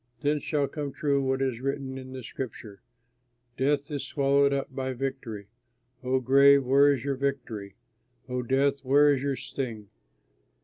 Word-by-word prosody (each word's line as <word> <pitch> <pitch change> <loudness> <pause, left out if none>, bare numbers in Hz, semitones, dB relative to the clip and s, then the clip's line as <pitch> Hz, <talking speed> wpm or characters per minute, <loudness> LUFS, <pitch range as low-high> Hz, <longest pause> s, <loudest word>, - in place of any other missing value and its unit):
Then 150 +1 +1
shall 145 -1 -1
come 145 -1 -5
true 140 -3 +1
what 135 0 0
is 125 -3 -2
written 135 -1 -3
in 130 0 -8
Scripture 110 -4 -7 0.7
"Death 140 +3 0
is 145 -2 -3
swallowed 140 0 +2
up 135 -1 -2
by 130 0 -3
victory. 125 -5 -5 0.6
O 130 +1 +1
grave, 140 +2 +5
where 140 +3 +5
is 135 -2 -2
your 140 -1 0
victory? 120 -8 -4 0.5
O 125 -1 -2
death, 135 +3 +1
where 145 +2 +5
is 135 - -2
your 140 -1 -1
sting?" 115 -7 -6
135 Hz, 150 wpm, -27 LUFS, 130-140 Hz, 0.7 s, grave